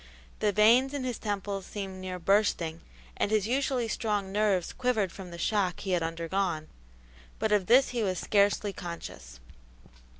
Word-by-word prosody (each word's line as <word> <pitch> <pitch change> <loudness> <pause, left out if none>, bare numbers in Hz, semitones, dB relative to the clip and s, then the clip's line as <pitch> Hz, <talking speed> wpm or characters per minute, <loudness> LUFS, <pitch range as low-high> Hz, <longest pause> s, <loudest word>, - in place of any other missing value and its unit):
The 210 - +2
veins 235 +7 +5
in 280 - -3
his 250 -3 -3
temples 200 -2 -3
seemed 195 -2 -6
near 185 -1 -4
bursting 170 -3 +1 0.4
and - - +1
his 215 -2 +2
usually 260 -1 0
strong 210 -3 -1
nerves 200 -4 +1
quivered 225 -7 0
from 190 -1 -9
the 170 - -8
shock 190 -2 0
he 195 - -3
had 175 -2 +2
undergone, 165 0 -2 0.7
but 220 - -1
of 205 -3 +2
this 255 +4 +6
he 240 -2 -2
was 190 -4 0
scarcely 205 +1 +2
conscious. 65 - -8
200 Hz, 160 wpm, -29 LUFS, 180-215 Hz, 0.7 s, this